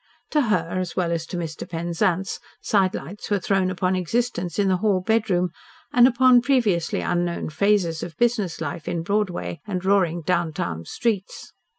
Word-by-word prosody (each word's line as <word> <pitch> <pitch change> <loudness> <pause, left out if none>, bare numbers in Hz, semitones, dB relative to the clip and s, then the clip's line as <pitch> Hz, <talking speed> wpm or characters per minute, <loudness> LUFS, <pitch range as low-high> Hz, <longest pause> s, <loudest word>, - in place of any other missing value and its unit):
To 300 - +3
her, 185 - +1
as 180 -2 -4
well 175 -2 0
as 165 -1 -2
to 180 - -5
Mr. 160 -2 -5
Penzance, 170 +2 -1 0.2
sidelights 195 -1 -1
were 205 - +2
thrown 190 0 +1
upon 185 0 0
existence 185 0 -1
in 205 -1 +2
the 185 -1 +3
"hall 200 -1 +2
bedroom" 185 -3 +1 0.4
and 245 0 +7
upon 255 -1 +5
previously 235 -10 +1
unknown 175 -2 -1
phases 180 -2 +1
of 165 -2 -7
business 225 -8 +1
life 155 0 -5
in 165 -1 -2
Broadway 185 -4 -2
and 185 -2 -3
roaring 180 -4 +2
"downtown" 145 - -1
streets. 205 - -3
185 Hz, 160 wpm, -23 LUFS, 170-210 Hz, 0.4 s, and